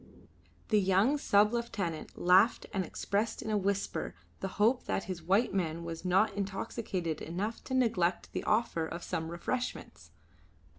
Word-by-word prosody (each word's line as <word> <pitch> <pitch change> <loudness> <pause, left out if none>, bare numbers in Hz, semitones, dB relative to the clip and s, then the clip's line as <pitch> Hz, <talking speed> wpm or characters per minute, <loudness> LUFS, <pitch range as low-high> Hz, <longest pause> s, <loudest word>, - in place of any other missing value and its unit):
The 215 -2 +4
young 200 +9 +3
sub 210 -2 +4
lieutenant 200 -9 -3
laughed 185 +6 +4
and 190 -2 0
expressed 200 +5 -2
in 220 - -3
a - - +2
whisper 200 0 -2 0.2
the 190 - -2
hope 230 +5 +3
that - - -1
the 185 - -2
white 190 +8 +2
man 170 -3 -1
was 165 -1 -6
not 190 +4 +3
intoxicated 195 -4 -3
enough 195 +8 -3
to 260 - -2
neglect 185 -9 +1
the - - -2
offer 215 -7 +1
of 170 +2 -6
some 160 0 -3
refreshments. 175 - -4
195 Hz, 150 wpm, -31 LUFS, 175-220 Hz, 0.2 s, The